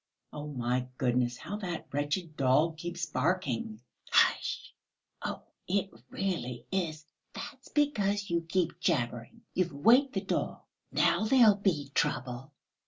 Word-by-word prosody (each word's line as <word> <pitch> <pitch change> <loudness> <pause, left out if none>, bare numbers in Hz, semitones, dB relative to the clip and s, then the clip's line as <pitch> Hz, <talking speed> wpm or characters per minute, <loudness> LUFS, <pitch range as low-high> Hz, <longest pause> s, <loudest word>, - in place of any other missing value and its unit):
"Oh, 150 0 -5
my 125 -2 -1
goodness, 125 -1 +1
how 205 - -5
that 175 -6 -4
wretched 145 +3 -2
dog 150 +5 +3
keeps 175 +1 -3
barking!" 130 -7 -1 0.3
"Hush! - - +2 0.5
Oh, - - -4 0.2
it 195 +1 0 0.2
really 165 -11 -3
is.... 160 -5 -2 0.3
That's 260 -1 -8
because 205 -9 +1
you 170 0 +2
keep 175 -1 0
jabbering. 120 -10 -1
You've 180 -3 0
waked 250 - +5
the - - 0
dog, - - -2 0.3
now - - +3
there 235 -1 +7
will 205 - +5
be 160 -9 0
trouble." 125 +3 -1
165 Hz, 130 wpm, -30 LUFS, 130-195 Hz, 0.5 s, there